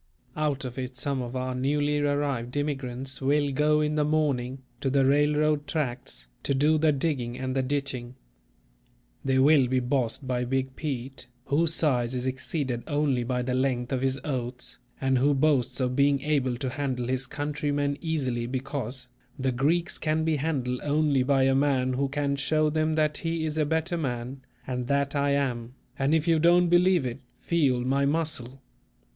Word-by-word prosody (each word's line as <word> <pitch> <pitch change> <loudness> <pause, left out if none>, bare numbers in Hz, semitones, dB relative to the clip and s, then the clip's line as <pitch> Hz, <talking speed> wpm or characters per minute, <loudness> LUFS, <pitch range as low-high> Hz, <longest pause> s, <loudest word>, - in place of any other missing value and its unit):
Out 145 -3 -1
of 125 +1 -6
it 125 0 -5
some 135 0 -1
of 120 +1 -6
our 130 0 -2
newly 145 +3 +1
arrived 145 -3 -1
immigrants 135 -3 -3
will 145 +1 +2
go 150 +2 +2
in 150 0 0
the 150 -1 +2
morning, 135 -4 0 0.2
to 135 - -1
the 135 0 +3
railroad 150 +1 +2
tracks, 125 - -3 0.2
to 140 - 0
do 150 +3 +3
the 155 0 +4
digging 135 -5 -1
and 130 0 -3
the 135 - +2
ditching. 130 -2 -3 1.1
They 130 -1 +1
will 135 -1 +5
be 130 +1 +1
"bossed" 125 +1 -1
by 125 -1 0
"Big 130 +1 -2
Pete," 135 -3 -5 0.2
whose 160 +3 +2
size 125 -5 +1
is 125 0 -2
exceeded 130 -1 -2
only 145 -4 +1
by 125 +1 -1
the 125 +1 -2
length 125 -1 0
of 130 - 0
his 135 0 0
oaths, 125 -3 -4 0.2
and 135 -1 +2
who 140 +2 +3
boasts 135 -3 +2
of 125 -1 0
being 140 0 +3
able 135 -4 0
to 130 +2 -2
handle 130 -3 -2
his 130 +1 -1
countrymen 145 0 -1
easily, 130 -8 -1
because: 130 -1 -4 0.3
"The 130 -1 0
Greeks 160 +8 0
can 155 0 0
be 160 -1 +1
handled 130 -4 -1
only 145 -2 +2
by 135 +1 +3
a 135 0 +4
man 135 -2 +2
who 135 +2 0
can 140 0 -1
show 155 +2 +1
them 155 0 +1
that 155 -1 +1
he 165 -1 -2
is 155 0 -2
a 155 - +3
better 160 +3 0
man, 130 -2 -4 0.2
and 125 -1 -3
that 140 +1 0
I 140 0 +2
am; 125 -3 -2 0.2
and 140 +3 +3
if 160 +1 0
you 165 -1 +4
don't 175 +2 +5
believe 175 -3 +4
it, 125 +1 -4 0.2
feel 140 -7 +1
my 135 +2 +1
muscle. 140 -4 -2
140 Hz, 180 wpm, -27 LUFS, 130-150 Hz, 1.1 s, will